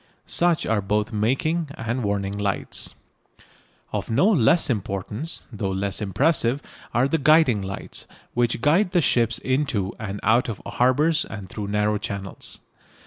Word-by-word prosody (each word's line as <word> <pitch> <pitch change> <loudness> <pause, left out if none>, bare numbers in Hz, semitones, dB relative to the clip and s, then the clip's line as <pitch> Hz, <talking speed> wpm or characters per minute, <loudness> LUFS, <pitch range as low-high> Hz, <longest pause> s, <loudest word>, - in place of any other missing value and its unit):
Such 170 -2 +2
are 110 -2 +1
both 105 +3 -1
making 140 +9 0
and 120 +3 -2
warning 100 -1 -1
lights. 100 -1 -2 1.0
Of - - -3
no 145 - +3
less 165 - +4
importance, 105 - -3
though 100 -2 -2
less 95 +2 -2
impressive, 120 - +2 0.3
are 125 +3 +2
the 160 +3 0
guiding 150 -7 +5
lights, 95 0 -6 0.3
which 120 -1 +1
guide 175 +8 +3
the 175 - +4
ships 115 -5 +2
into 130 -8 0
and 100 -2 -4
out 120 +2 +3
of 105 - -4
harbours 150 +6 +2
and 105 -3 -8
through 105 +1 -5
narrow 105 +1 +1
channels. 100 -1 -5
115 Hz, 140 wpm, -24 LUFS, 100-145 Hz, 1.0 s, guiding